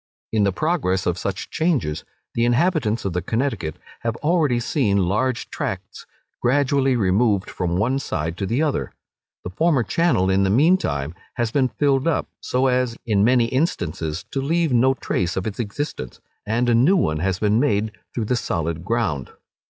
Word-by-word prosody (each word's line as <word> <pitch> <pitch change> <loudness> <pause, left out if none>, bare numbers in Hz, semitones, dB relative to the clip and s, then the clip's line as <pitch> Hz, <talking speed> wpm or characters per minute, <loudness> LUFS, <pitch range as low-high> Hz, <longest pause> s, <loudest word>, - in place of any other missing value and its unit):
In 105 -2 +2
the 100 - +2
progress 95 - 0
of 90 0 0
such 95 -1 -4
changes, 145 - 0 0.3
the 115 - 0
inhabitants 120 - +1
of 95 - -1
the 90 - -1
Connecticut 110 - -2 0.2
have 115 -1 -2
already 150 -6 +2
seen 120 -5 +1
large 120 +7 -1
tracts - - -5 0.3
gradually 135 +1 +2
removed 100 -1 +2
from 90 -1 -1
one 125 +7 +1
side 80 - -3
to 100 - -2
the 125 +9 +1
other. 150 -3 -1 0.5
The 90 - -5
former 150 - +2
channel 155 - +2
in 95 +1 +3
the 95 - +2
mean 155 - +5
time 70 - -3 0.2
has 120 -2 -1
been 130 0 +2
filled 140 +1 +1
up, 165 - +1
so 130 +1 0
as, 125 -2 +1
in 105 -3 +2
many 120 +1 +4
instances, 85 - -1
to 135 - -1
leave 165 +1 +1
no 130 +2 +4
trace 90 -8 -2
of 95 - -2
its 110 0 -4
existence, 110 - -4 0.3
and 120 +3 +1
a 120 - +3
new 140 +12 +4
one 75 - +1
has 95 +2 0
been 105 +3 +2
made 110 -6 +1 0.2
through 115 - -1
the 125 - +1
solid 85 -7 -2
ground. 95 - -1
115 Hz, 175 wpm, -22 LUFS, 95-135 Hz, 0.5 s, mean